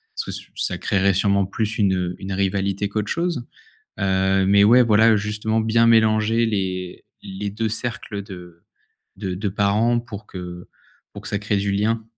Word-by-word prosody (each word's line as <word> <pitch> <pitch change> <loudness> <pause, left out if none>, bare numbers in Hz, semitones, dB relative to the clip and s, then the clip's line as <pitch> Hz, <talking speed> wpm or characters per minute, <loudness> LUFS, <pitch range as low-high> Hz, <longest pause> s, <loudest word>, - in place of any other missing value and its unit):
Sous 450 - -4 0.2
ça - - 0
créerait 100 -1 +1
sûrement 100 0 +2
plus 110 +2 -3
une, 100 -3 +2
heu, 90 -1 -2
une 95 0 -5
rivalité 100 +1 -1
qu'autre 105 0 -3
chose, 165 -7 -2 0.6
heu, 95 0 +2
mais 100 +1 +5
ouais, 125 +4 +6
voilà, 110 0 +5
justement, 105 +2 -1
bien 115 +1 +3
mélanger 110 0 +3
les 95 -4 -3 0.2
les 100 +1 -5
2 110 +2 -2
cercles 115 -3 -4
de 90 -4 -12 0.5
de 95 -2 -4
de 100 +2 -2
parents 105 +4 +1
pour 110 -3 -10
que 90 -1 -8 0.4
pour - - -10
que - - -8
ça 100 - -1
crée 105 0 -1
du 100 0 -1
lien. 110 +3 0
100 Hz, 170 wpm, -22 LUFS, 95-110 Hz, 0.6 s, ouais